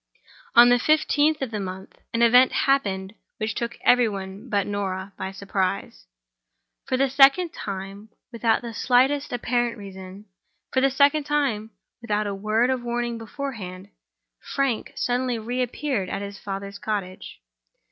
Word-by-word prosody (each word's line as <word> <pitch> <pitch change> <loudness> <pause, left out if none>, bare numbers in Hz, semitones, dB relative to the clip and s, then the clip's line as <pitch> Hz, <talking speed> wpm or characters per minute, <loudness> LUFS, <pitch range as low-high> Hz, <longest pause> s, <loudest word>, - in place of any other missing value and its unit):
On 240 +1 +9
the 245 0 +5
fifteenth 305 +1 +2
of 255 - -4
the 215 - -3
month, 190 -1 -7
an 230 +1 +1
event 250 +2 +6
happened 200 -8 0 0.2
which 215 0 -2
took 235 0 -4
every 245 -2 +4
one 195 +3 -7
but 200 -2 +1
Norah 195 -1 -3
by 190 0 -5
surprise. 190 - -3 0.8
For 255 - 0
the 275 +1 +3
second 275 +6 +5
time, 195 +2 -7 0.2
without 230 0 +1
the 235 -1 -6
slightest 265 +5 +2
apparent 240 -1 -1
reason—for 195 +5 -7
the 275 - +4
second 285 +2 +3
time, 275 -8 0 0.3
without 215 -2 -1
a 200 - -2
word 215 +5 +1
of 260 -1 -1
warning 240 -1 -2
beforehand—Frank 225 +2 -5
suddenly 250 0 0
re 240 +3 -3
appeared 250 -5 -2
at 200 - -3
his 200 -1 -8
father's 200 0 -6
cottage. 195 -4 -5
225 Hz, 140 wpm, -24 LUFS, 200-255 Hz, 0.8 s, On